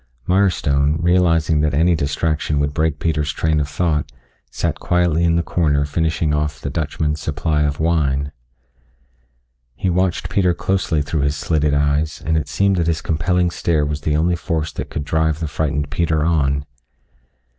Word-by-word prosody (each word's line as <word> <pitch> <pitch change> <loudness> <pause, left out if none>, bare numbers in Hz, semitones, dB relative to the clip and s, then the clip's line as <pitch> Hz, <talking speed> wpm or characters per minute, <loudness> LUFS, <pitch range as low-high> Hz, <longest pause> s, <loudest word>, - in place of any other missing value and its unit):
Mirestone, 80 -6 +2
realizing 85 -3 +2
that 75 -2 +1
any 85 +4 +3
distraction 75 0 -1
would 70 0 -1
break 80 -1 0
Peter's 75 -3 -1
train 80 +1 0
of 70 -1 -2
thought, 75 -1 -1 0.4
sat - - -2
quietly 85 -2 +1
in 85 -1 +3
the 85 - +1
corner 75 -5 +1
finishing 80 0 0
off 75 0 -1
the 70 - -5
Dutchman's 75 0 -2
supply 75 +1 -1
of 75 -1 0
wine. 70 -4 0 1.4
He 90 +9 -1
watched 90 0 0
Peter 90 -3 +1
closely 85 -4 0
through 75 +1 -2
his 70 +1 0
slitted 75 -3 +1
eyes, 75 +1 0
and 80 0 +1
it 75 -3 0
seemed 100 +5 +1
that 85 -2 0
his 80 -2 -1
compelling 90 +2 +1
stare 80 -4 0
was 75 0 -3
the 75 0 0
only 85 +3 +2
force 80 -1 -2
that - - -6
could - - -4
drive 80 0 0
the 80 - -2
frightened 75 -1 -2
Peter 80 -3 0
on. 70 -4 +1
80 Hz, 165 wpm, -19 LUFS, 75-85 Hz, 1.4 s, any